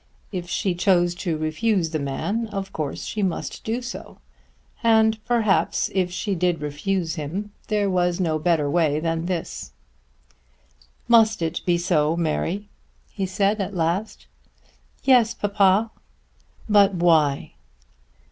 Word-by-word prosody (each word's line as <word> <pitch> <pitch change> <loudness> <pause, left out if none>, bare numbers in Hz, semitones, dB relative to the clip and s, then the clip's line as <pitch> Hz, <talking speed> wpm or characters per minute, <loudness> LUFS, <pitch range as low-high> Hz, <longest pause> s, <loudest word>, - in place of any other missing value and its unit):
If 180 -3 -5
she 190 -2 0
chose 175 -1 +2
to 175 -2 -3
refuse 165 +3 0
the 155 - -1
man 200 +11 -2
of 195 -2 -5
course 150 -3 -4
she 215 - -3
must 190 -3 -3
do 235 +3 -2
so; 240 - -8 0.6
and 220 -1 +3
perhaps, 230 -5 +1
if 185 -2 +1
she 200 +3 -2
did 175 -2 0
refuse 160 +4 -2
him, 195 +8 -5 0.2
there 210 -2 +1
was 180 -2 +1
no 160 -4 +1
way - - -9
better 155 -2 +2
than 165 +1 -2
this. 170 - -4 1.3
"Must 225 -5 +4
it 165 +1 -2
be 175 -1 +3
so, 165 -2 +1
Mary?" 175 +5 -1 0.4
he 195 -2 -3
said 200 +3 +1
at 195 0 -4
last. 175 +5 -2 0.8
"Yes, 245 -4 +4
papa." 205 +1 +2 0.8
"But 205 -2 +5
why?" 160 -5 +2
185 Hz, 130 wpm, -23 LUFS, 165-210 Hz, 1.3 s, But